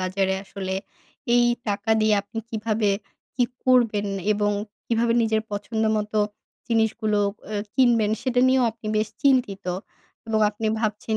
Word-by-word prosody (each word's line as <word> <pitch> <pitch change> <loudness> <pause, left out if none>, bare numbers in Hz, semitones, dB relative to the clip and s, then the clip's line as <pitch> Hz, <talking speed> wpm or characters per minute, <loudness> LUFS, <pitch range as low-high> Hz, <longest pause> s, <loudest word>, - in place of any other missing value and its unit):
বাজারে 190 +1 0
আসলে 190 -1 -4 0.6
এই 245 - +5 0.2
টাকা 205 +2 -1
দিয়ে 215 -1 +4
আপনি 220 +2 -8
কীভাবে 220 -1 0 0.5
কি 245 - +3 0.2
করবেন 230 -5 +3 0.3
এবং 205 0 +1 0.4
কীভাবে 230 0 +2
নিজের 220 -1 +1
পছন্দ 215 +2 -3
মতো 210 0 -1 0.5
জিনিসগুলো 220 -2 +1 0.3
অ্যা 210 -1 -3
কিনবেন 235 -5 +4
সেটা 250 -1 +1
নিয়েও 260 -2 +4 0.3
বেশ 215 0 +1
চিন্তিত 250 -8 +2 0.6
এবং 220 -1 +1
আপনি 220 +1 -4
ভাবছেন 215 0 -1
220 Hz, 130 wpm, -24 LUFS, 205-230 Hz, 0.6 s, এই